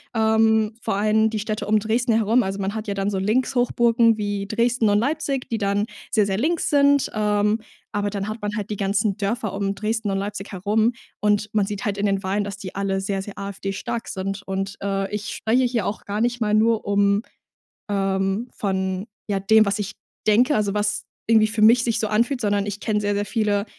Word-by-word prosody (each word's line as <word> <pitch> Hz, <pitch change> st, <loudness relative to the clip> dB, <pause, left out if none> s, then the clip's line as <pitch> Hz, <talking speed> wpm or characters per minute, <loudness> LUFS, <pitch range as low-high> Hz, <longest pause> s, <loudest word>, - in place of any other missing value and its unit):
ähm, 220 Hz, 0 st, +3 dB
vor -, -, -1 dB
allem 215 Hz, +2 st, +3 dB
die 220 Hz, -1 st, -3 dB
Städte 215 Hz, 0 st, -3 dB
um 215 Hz, +1 st, +4 dB
Dresden 225 Hz, +3 st, +1 dB
herum. 225 Hz, +2 st, +3 dB
Also, 195 Hz, -3 st, -3 dB
man 195 Hz, +1 st, -2 dB
hat 220 Hz, -1 st, -5 dB
ja 200 Hz, -, -2 dB
dann 195 Hz, +1 st, -1 dB
so 195 Hz, -, -1 dB
Linkshochburgen 235 Hz, +1 st, +2 dB
wie 205 Hz, -1 st, -2 dB
Dresden 230 Hz, +1 st, +1 dB
und 205 Hz, -, +3 dB
Leipzig, 275 Hz, +2 st, -1 dB
die 225 Hz, -, -1 dB
dann 200 Hz, +1 st, +1 dB, 0.2 s
sehr, 215 Hz, -3 st, +3 dB
sehr 195 Hz, -1 st, -1 dB
links 320 Hz, +9 st, 0 dB
sind, 285 Hz, -1 st, +4 dB
ähm, 210 Hz, +1 st, +1 dB, 0.3 s
aber 205 Hz, 0 st, -1 dB
dann 200 Hz, 0 st, -4 dB
hat 215 Hz, +1 st, -6 dB
man 205 Hz, -, -2 dB
halt 210 Hz, -1 st, -4 dB
die 205 Hz, -, -3 dB
ganzen 200 Hz, 0 st, +1 dB
Dörfer 215 Hz, +1 st, -2 dB
um 200 Hz, 0 st, -2 dB
Dresden 215 Hz, +1 st, -2 dB
und 195 Hz, -, 0 dB
Leipzig 200 Hz, +1 st, -5 dB
herum 215 Hz, +5 st, +1 dB, 0.3 s
und 210 Hz, 0 st, +1 dB
man 205 Hz, -2 st, +2 dB
sieht 205 Hz, -1 st, -5 dB
halt 205 Hz, -1 st, -1 dB
in 205 Hz, -, +1 dB
den 195 Hz, 0 st, 0 dB
Wahlen, 200 Hz, +2 st, 0 dB
dass 200 Hz, 0 st, -6 dB
die 190 Hz, -2 st, -8 dB
alle 195 Hz, 0 st, -1 dB
sehr, 195 Hz, 0 st, -2 dB
sehr 200 Hz, 0 st, -9 dB
AfD-stark 200 Hz, +4 st, -4 dB
sind. 195 Hz, +1 st, -4 dB
Und, 195 Hz, 0 st, -4 dB
äh, 195 Hz, 0 st, -2 dB
ich 210 Hz, 0 st, -3 dB
spreche 250 Hz, +3 st, +2 dB
hier 235 Hz, -5 st, 0 dB
auch 210 Hz, -, -4 dB
gar 205 Hz, +2 st, -2 dB
nicht 240 Hz, 0 st, 0 dB
mal 210 Hz, -1 st, +2 dB
nur 225 Hz, +1 st, +3 dB
um 200 Hz, 0 st, +2 dB, 0.7 s
ähm, 195 Hz, +2 st, 0 dB
von, 190 Hz, -1 st, -2 dB, 0.2 s
ja, 200 Hz, -1 st, 0 dB
dem, 215 Hz, +3 st, +5 dB
was 200 Hz, 0 st, -1 dB
ich 200 Hz, -1 st, -3 dB, 0.3 s
denke, 245 Hz, +7 st, +4 dB
also, 205 Hz, -2 st, +1 dB
was 205 Hz, 0 st, -1 dB, 0.2 s
irgendwie 220 Hz, -1 st, +5 dB
für 215 Hz, 0 st, -1 dB
mich 235 Hz, +2 st, +7 dB
sich 230 Hz, -2 st, 0 dB
so 220 Hz, -, 0 dB
anfühlt, 240 Hz, +5 st, +1 dB
sondern 205 Hz, -2 st, 0 dB
ich 205 Hz, 0 st, -4 dB
kenne 210 Hz, -1 st, 0 dB
sehr, 205 Hz, 0 st, 0 dB
sehr 205 Hz, -, 0 dB
viele 205 Hz, -1 st, 0 dB
210 Hz, 215 wpm, -23 LUFS, 200-225 Hz, 0.7 s, mich